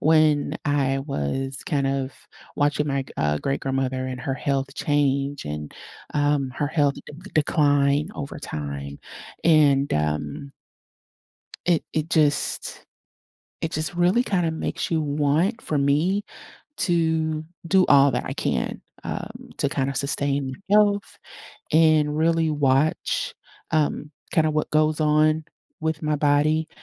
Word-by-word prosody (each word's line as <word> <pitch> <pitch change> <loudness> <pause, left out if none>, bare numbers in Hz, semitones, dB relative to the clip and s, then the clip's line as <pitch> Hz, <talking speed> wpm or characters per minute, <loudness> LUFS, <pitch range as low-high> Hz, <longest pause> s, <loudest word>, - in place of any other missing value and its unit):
when 155 -2 +3
I 135 -2 +1
was 135 - -3
kind 140 -4 0
of 135 0 -1 0.4
watching 145 +1 +1
my 140 -1 0
g 130 - -14
uh, 75 0 +1
great-grandmother 135 - -1
and 125 -1 -5
her 135 +1 -2
health 135 0 -2
change 140 -1 0
and, 75 0 -5 0.4
um, 145 -2 +1
her 145 - 0
health 145 -3 +2
de - - -11
d 180 +7 -12
decline 145 0 +2
over 140 - -6
time, 70 - -5 0.5
and 145 -4 +4
um 75 - -2 1.1
it 175 -3 +3
it 155 +1 -2
just 150 -2 +1 0.8
it 165 - -2
just 160 +3 -2
really 180 +7 +3
kinda 180 -7 0
makes 160 - -3
you 160 -2 +1
want, 150 +9 +1
for 150 - -2
me, 155 +9 +2 0.6
to 160 -3 +1 0.2
do 190 -1 +4
all 140 0 +6
that 125 -1 -2
I - - -3
can, - - -2 0.2
um, - - -6
to - - +1
kinda 135 0 -1
sustain 140 0 0 0.2
health 205 -1 +3 0.5
and 155 -2 +4
really 165 0 +2
watch, 145 0 +1 0.4
um, 150 -1 0 0.2
kinda 155 -1 +3
what 155 0 -1
goes 155 0 +2
on 155 +1 +3 0.4
with 160 -1 -1
my 150 0 +1
body, 150 +2 +2
145 Hz, 130 wpm, -24 LUFS, 135-155 Hz, 1.1 s, all